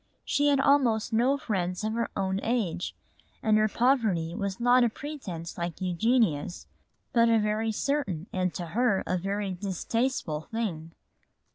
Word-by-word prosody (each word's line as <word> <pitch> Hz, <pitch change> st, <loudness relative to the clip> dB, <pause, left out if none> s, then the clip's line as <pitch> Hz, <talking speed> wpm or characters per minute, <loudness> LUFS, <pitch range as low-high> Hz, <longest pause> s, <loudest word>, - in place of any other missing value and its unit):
She 290 Hz, 0 st, +2 dB
had 285 Hz, -1 st, +4 dB
almost 255 Hz, -6 st, +3 dB
no 250 Hz, +5 st, +3 dB
friends 185 Hz, -7 st, -2 dB
of 215 Hz, 0 st, -1 dB
her 235 Hz, 0 st, -1 dB
own 190 Hz, 0 st, 0 dB
age 220 Hz, -8 st, -1 dB, 0.5 s
and 215 Hz, -1 st, +4 dB
her 215 Hz, -, +4 dB
poverty 215 Hz, -9 st, +1 dB
was 200 Hz, -1 st, -3 dB
not 245 Hz, +1 st, +5 dB
a 240 Hz, -, +3 dB
pretence 200 Hz, -, -7 dB
like 170 Hz, -1 st, -3 dB
Eugenia's, 185 Hz, -, +1 dB, 0.5 s
but 230 Hz, -1 st, +5 dB
a 230 Hz, -, +5 dB
very 215 Hz, +1 st, 0 dB
certain 215 Hz, -, -1 dB
and 185 Hz, -1 st, 0 dB
to 175 Hz, -, -3 dB
her 225 Hz, 0 st, +1 dB
a 185 Hz, -, 0 dB
very 195 Hz, +2 st, -2 dB
distasteful 190 Hz, -2 st, -2 dB
thing. 170 Hz, -8 st, -3 dB
215 Hz, 150 wpm, -28 LUFS, 180-240 Hz, 0.5 s, not